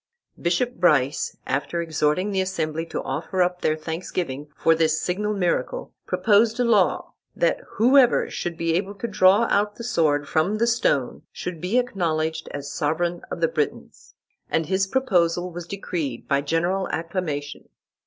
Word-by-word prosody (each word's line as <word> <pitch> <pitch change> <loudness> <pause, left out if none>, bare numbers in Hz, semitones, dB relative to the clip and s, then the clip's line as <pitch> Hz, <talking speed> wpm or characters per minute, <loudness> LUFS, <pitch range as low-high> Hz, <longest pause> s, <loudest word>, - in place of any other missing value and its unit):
Bishop 210 +9 0
Brice, 150 -6 +2
after 140 +6 -2
exhorting 165 +3 0
the 190 -1 +1
assembly 165 -3 -2
to - - -4
offer 185 -2 -1
up 180 0 -2
their 155 - +2
thanksgiving 155 -3 -4
for 165 - +4
this 160 -1 +2
signal 210 +4 -1
miracle, 195 - -1
proposed 225 +2 +3
a - - +4
law, 215 -6 +2 0.2
that - - +1
whoever 250 +2 +5
should 170 -1 -4
be 165 0 0
able 195 +4 -1
to 220 +4 -4
draw 195 +1 +5
out 205 +1 +2
the 235 - -8
sword 150 -11 +1
from 165 +9 +1
the 230 - +2
stone, 225 - +1
should 175 -3 -6
be 190 +7 0
acknowledged 160 -9 -1
as 145 -1 -6
sovereign 170 +4 -1
of 170 - -5
the 165 - +4
Britons; 155 -2 -4 0.3
and 160 - +1
his 190 +3 +1
proposal 180 -8 +1
was 175 0 -7
decreed 165 -10 -4
by 140 0 +2
general 170 +6 0
acclamation. 160 -4 -4
175 Hz, 155 wpm, -24 LUFS, 160-200 Hz, 0.3 s, whoever